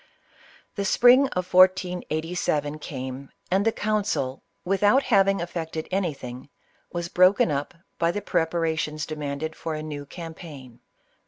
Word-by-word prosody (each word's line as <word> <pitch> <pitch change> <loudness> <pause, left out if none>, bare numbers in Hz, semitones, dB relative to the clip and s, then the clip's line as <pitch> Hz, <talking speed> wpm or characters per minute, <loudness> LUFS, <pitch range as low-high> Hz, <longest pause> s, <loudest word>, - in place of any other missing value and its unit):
The 200 - 0
spring 250 +7 +6
of 180 -6 -4
1487 175 -5 +2
came, 130 -1 -6 0.2
and 190 +2 +3
the 225 - +3
council, 205 -13 -1 0.2
without 205 +8 +3
having 195 -3 +3
effected 160 -2 -4
anything, 140 -9 -3 0.4
was 170 -1 -3
broken 185 -1 +4
up 145 +3 -3 0.2
by 170 - +2
the 205 +3 -3
prep 165 -4 +1
arations 160 -2 -1
demanded 150 0 -4
for 160 -1 -4
a 155 - -5
new 145 -2 -6
campaign. 155 -7 -10
165 Hz, 130 wpm, -25 LUFS, 150-190 Hz, 0.4 s, spring